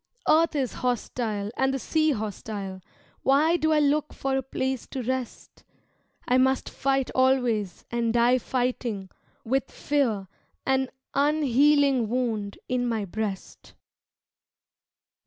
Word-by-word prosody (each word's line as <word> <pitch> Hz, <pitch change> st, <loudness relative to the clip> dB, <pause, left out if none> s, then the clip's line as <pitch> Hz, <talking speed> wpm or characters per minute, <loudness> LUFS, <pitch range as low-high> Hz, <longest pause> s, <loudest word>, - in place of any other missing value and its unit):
Earth 320 Hz, 0 st, +4 dB
is 265 Hz, -4 st, -1 dB
hostile 225 Hz, -4 st, -2 dB
and 265 Hz, 0 st, +1 dB
the -, -, 0 dB
sea 310 Hz, +5 st, +1 dB
hostile, 205 Hz, -5 st, -4 dB, 0.4 s
Why 300 Hz, +5 st, +4 dB
do 315 Hz, -2 st, +1 dB
I 305 Hz, -, +4 dB
look 295 Hz, +1 st, +1 dB
for 270 Hz, 0 st, -1 dB
a 270 Hz, -, +1 dB
place 265 Hz, -1 st, -3 dB
to 260 Hz, -, -5 dB
rest? 255 Hz, 0 st, -5 dB, 0.6 s
I 250 Hz, +1 st, +4 dB
must 265 Hz, 0 st, +1 dB
fight 270 Hz, -1 st, 0 dB
always 245 Hz, -8 st, +1 dB
and 235 Hz, -1 st, 0 dB
die 240 Hz, +2 st, +4 dB
fighting 245 Hz, -6 st, -2 dB, 0.3 s
With 265 Hz, +4 st, 0 dB
fear 235 Hz, -10 st, 0 dB, 0.4 s
an 265 Hz, -1 st, +1 dB, 0.2 s
unhealing 285 Hz, -3 st, +3 dB
wound 225 Hz, -5 st, -2 dB
in 250 Hz, -1 st, 0 dB
my 225 Hz, -3 st, -1 dB
breast. 200 Hz, 0 st, -5 dB
255 Hz, 120 wpm, -26 LUFS, 225-270 Hz, 0.6 s, Earth